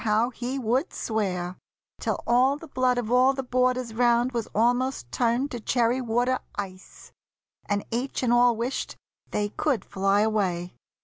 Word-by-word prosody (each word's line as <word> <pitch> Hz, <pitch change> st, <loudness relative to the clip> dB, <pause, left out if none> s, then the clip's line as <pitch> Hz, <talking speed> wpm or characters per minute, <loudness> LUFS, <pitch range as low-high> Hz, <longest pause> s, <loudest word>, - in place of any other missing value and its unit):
how 220 Hz, +3 st, +2 dB
he 250 Hz, +2 st, -4 dB
would 255 Hz, -, 0 dB
swear! 185 Hz, -5 st, -2 dB, 0.4 s
Till -, -, -1 dB
all 255 Hz, +4 st, +3 dB
the 325 Hz, -, -11 dB
blood 255 Hz, -3 st, +1 dB
of 235 Hz, -2 st, -2 dB
all 255 Hz, +2 st, +5 dB
the 270 Hz, -, -3 dB
boarders 250 Hz, -1 st, 0 dB
round 240 Hz, +1 st, +3 dB
Was 235 Hz, -3 st, -2 dB
almost 245 Hz, -, +1 dB
turned 245 Hz, +4 st, +1 dB
to 240 Hz, -, -4 dB
cherry 240 Hz, +2 st, +1 dB
water 245 Hz, +2 st, +1 dB, 0.2 s
ice, 190 Hz, -2 st, -8 dB, 0.6 s
And 205 Hz, 0 st, 0 dB
each 250 Hz, +3 st, -2 dB
and 240 Hz, -1 st, +3 dB
all 240 Hz, 0 st, +5 dB
wished 240 Hz, +4 st, -3 dB, 0.3 s
they 205 Hz, 0 st, -1 dB
could 265 Hz, +2 st, -1 dB
fly 195 Hz, +1 st, +1 dB
away. 190 Hz, -5 st, 0 dB
240 Hz, 160 wpm, -26 LUFS, 215-255 Hz, 0.6 s, all